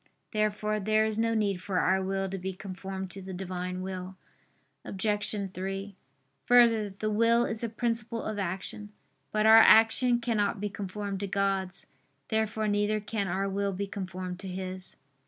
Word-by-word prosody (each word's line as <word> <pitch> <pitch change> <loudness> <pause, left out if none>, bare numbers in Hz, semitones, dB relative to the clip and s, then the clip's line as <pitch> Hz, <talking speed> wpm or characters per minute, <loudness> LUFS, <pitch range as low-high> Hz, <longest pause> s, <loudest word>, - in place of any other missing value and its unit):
Therefore 215 0 0
there 215 +2 +2
is 220 0 -2
no 230 0 +2
need 205 -3 +1
for 185 +1 -3
our 190 +1 +3
will 195 0 -1
to 190 0 -4
be 190 +1 -4
conformed 190 0 -6
to 195 - -7
the 190 0 -7
Divine 180 0 -4
will. 185 0 -5 0.7
Obj. 205 +2 -2 0.2
3: 195 +1 -4 0.5
Further, 230 -4 +5
the 215 +2 -3
will 230 +2 +4
is 220 +1 -3
a 230 - -1
principle 230 0 -2
of 215 -1 -3
action. 195 +2 -4 0.4
But 215 0 +1
our 220 +1 +9
action 230 +3 +6
cannot 220 -4 0
be 205 0 -3
conformed 200 0 -4
to 200 - -3
God's. 195 -1 -1 0.4
Therefore 220 0 0
neither 205 +1 +1
can 205 -1 -3
our 190 +2 -1
will 200 0 -1
be 200 +2 -2
conformed 185 -2 -5
to 195 - -7
His. 185 0 -6
200 Hz, 165 wpm, -29 LUFS, 190-215 Hz, 0.7 s, our